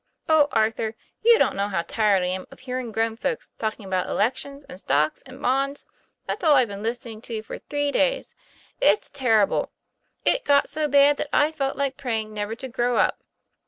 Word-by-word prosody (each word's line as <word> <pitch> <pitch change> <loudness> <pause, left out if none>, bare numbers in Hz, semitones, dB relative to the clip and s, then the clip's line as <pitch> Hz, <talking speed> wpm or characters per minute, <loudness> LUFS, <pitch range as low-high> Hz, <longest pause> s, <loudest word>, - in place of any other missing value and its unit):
O 315 -2 +5
Arthur, 220 0 0 0.3
you 465 +1 +6
don't - - +2
know 200 +1 0
how 190 -4 -1
tired 200 0 +2
I - - 0
am 185 +1 -3
of - - -15
hearing 255 -2 -4
grown 225 +1 0
folks 465 - -3
talking 215 -2 -3
about 185 -1 -1
elections 275 +6 -2
and 180 - -10
stocks 150 -1 +1
and 260 0 -12
bonds. 275 +2 0 0.4
That's 425 - -4
all 310 -3 +6
I've 255 -4 +3
been 200 0 -7
listening 230 0 -4
to 225 -2 -5
for - - -8
three 290 0 -2
days. - - 0 0.5
It's 460 - +3
terrible. 225 -7 +2 0.5
It - - +3
got 285 0 +3
so 310 -1 -1
bad 285 0 +5
that 290 - -3
I 295 +1 +3
felt 275 -4 -2
like 275 -1 -1
praying 220 -4 -3
never 210 +1 -3
to 260 +3 -7
grow 245 0 0
up." - - +1
245 Hz, 195 wpm, -24 LUFS, 215-280 Hz, 0.5 s, you